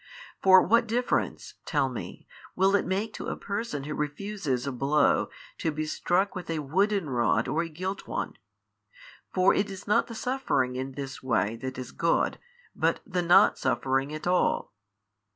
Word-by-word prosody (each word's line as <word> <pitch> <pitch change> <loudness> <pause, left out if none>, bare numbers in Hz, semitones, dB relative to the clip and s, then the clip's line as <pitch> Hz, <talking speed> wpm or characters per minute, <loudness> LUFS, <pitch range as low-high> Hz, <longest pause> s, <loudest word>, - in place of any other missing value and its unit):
For 190 -1 +7
what 230 +4 +3
difference 245 +3 -1
(tell 145 -3 +1
me) 125 -3 -7 0.3
will 190 +2 +4
it 200 - +1
make 200 +4 -1
to - - -6
a - - -2
person 200 -8 -4
who 150 +2 -4
refuses 150 -3 -2
a 140 - -2
blow 135 +4 +2 0.3
to 160 - 0
be 155 +1 -3
struck 185 +5 0
with 185 -3 -7
a 165 - -1
wooden 190 +5 +1
rod 120 -3 +1
or 160 - 0
a 170 - -4
gilt 185 +5 -5
one? - - -3 1.0
for 185 +1 +4
it 200 0 0
is 195 -1 -8
not 210 - +3
the 230 - -8
suffering 220 - 0
in 130 +1 -4
this 135 0 -6
way 115 -4 0
that 130 +2 -6
is 130 -1 -6
good 165 - +1 0.4
but - - +1
the 185 -4 -1
not 175 +1 +5
suffering 135 +2 0
at 155 0 -6
all. 180 0 +1
165 Hz, 170 wpm, -28 LUFS, 135-195 Hz, 1.0 s, For